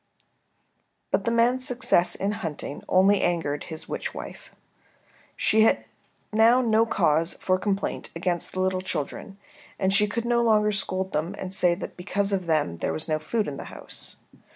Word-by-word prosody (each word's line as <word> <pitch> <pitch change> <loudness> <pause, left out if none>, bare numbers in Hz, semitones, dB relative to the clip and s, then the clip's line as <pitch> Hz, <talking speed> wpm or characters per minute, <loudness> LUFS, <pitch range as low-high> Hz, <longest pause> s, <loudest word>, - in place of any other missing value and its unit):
But - - +1
the 230 - +1
man's 240 +2 +3
success 240 -8 +2
in 200 +1 -1
hunting 165 -9 -5
only 195 +2 +4
angered 155 -4 -1
his 160 -1 -7
witch - - -4
wife. - - -9 0.8
She 220 - +3
had 225 - +3 0.5
now 225 +3 +6
no 225 -2 +3
cause 165 -4 +2
for 185 0 0
complaint 195 0 -2
against 175 0 -1
the 185 - -1
little 185 0 0
children, 190 +2 -5 0.4
and 190 0 +1
she 210 +1 +4
could 230 +3 -3
no 235 0 +2
longer 215 -2 +3
scold 190 -2 -2
them 165 +6 -1
and 185 0 -6
say 180 -2 +3
that 180 - -8
because 200 +3 -1
of 185 -3 -1
them 150 - +1
there - - -1
was 155 - -4
no 155 -1 0
food 210 +8 -1
in 140 - -5
the - - -7
house. - - -5
190 Hz, 175 wpm, -26 LUFS, 170-220 Hz, 0.8 s, now